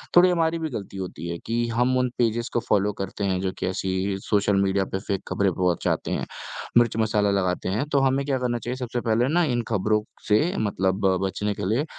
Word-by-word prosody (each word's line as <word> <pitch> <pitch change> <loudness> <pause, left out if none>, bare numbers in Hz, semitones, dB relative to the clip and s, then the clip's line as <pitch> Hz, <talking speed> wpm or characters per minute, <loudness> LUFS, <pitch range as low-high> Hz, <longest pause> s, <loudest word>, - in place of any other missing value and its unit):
थोड़ी 180 +1 +8
हमारी 165 -1 +1
भी 160 -1 -2
गलती 100 -5 -6
होती 90 -2 -5
है 85 - -3
कि 115 +1 0
हम 125 +3 +1
उन 125 -1 +2
पेजेज़ 115 0 +1
को 120 - +2
फ़ॉलो 105 -2 +1
करते 95 +1 -5
हैं, 95 -2 +1
जो 95 -1 -1
कि - - -2
ऐसी 95 +1 -1
सोशल 100 -1 +2
मीडिया 95 0 +2
पे 95 - -3
फेक 100 0 -3
खबरें 100 -2 +1
पहुँचाते 90 -1 0
हैं, - - -1 0.5
मिर्च 120 -2 +4
मसाला 105 -2 +2
लगाते 95 -2 0
हैं। 110 +9 0
तो 140 - +4
हमें 135 +1 +2
क्या 135 -2 +1
करना 120 -1 0
चाहिए 120 +3 -4
सबसे 125 -1 -3
पहले 115 +2 +2
ना 175 0 +4
इन 120 - +1
खबरों 105 0 +1 0.3
से 105 0 +5 0.2
मतलब 95 -2 0 0.2
बचने 105 +2 -1
के - - -4
लिए 130 +8 +1
105 Hz, 215 wpm, -25 LUFS, 95-120 Hz, 0.5 s, थोड़ी